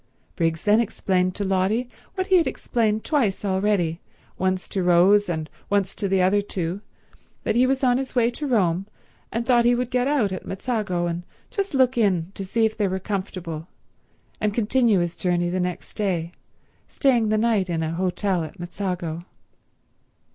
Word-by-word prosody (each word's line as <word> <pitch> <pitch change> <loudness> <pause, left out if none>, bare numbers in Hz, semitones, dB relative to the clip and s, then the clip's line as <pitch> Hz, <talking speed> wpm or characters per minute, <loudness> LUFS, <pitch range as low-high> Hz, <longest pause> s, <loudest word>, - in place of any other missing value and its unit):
Briggs 165 -1 0
then 210 +1 +4
explained 185 -5 0
to 205 - -2
Lotty 195 +5 +1 0.3
what 375 -1 -1
he 375 - +5
had 335 - +3
explained 220 -2 0
twice 235 -11 0
already, 190 -4 +1 0.3
once 185 0 -1
to 195 - -1
Rose 180 +3 +5
and 160 -2 -2 0.2
once 200 -2 +1
to 200 - -2
the 190 -1 +2
other 200 +3 +3
two, 185 -1 -3 0.6
that - - +1
he 250 +2 +4
was 270 +1 0
on 250 0 +4
his 265 -1 -5
way 240 -1 +3
to 295 +4 -4
Rome 190 -6 +1 0.4
and 235 +1 -2
thought 240 -2 +4
he 240 +1 +4
would 250 0 -2
get 250 +1 +1
out 270 -9 +2
at 185 - -4
Mezzago 195 -4 -2
and 170 0 -2 0.3
just 395 -7 -2
look 260 -2 +3
in 185 -5 +1
to 195 - -6
see 225 +4 +1
if 220 0 -1
they 210 -2 +1
were 190 0 -1
comfortable 185 -5 -4 0.7
and 210 -1 0
continue 230 -3 +3
his 175 0 -2
journey 175 -1 0
the 185 - -1
next 180 -1 -4
day, 175 -5 -1 0.6
staying 240 -6 +2
the 215 - +2
night 215 -4 +1
in 165 -1 -1
an 160 0 -2
hotel 185 0 0
at 160 +4 -9
Mezzago. 175 -2 -4
195 Hz, 180 wpm, -24 LUFS, 180-235 Hz, 0.7 s, he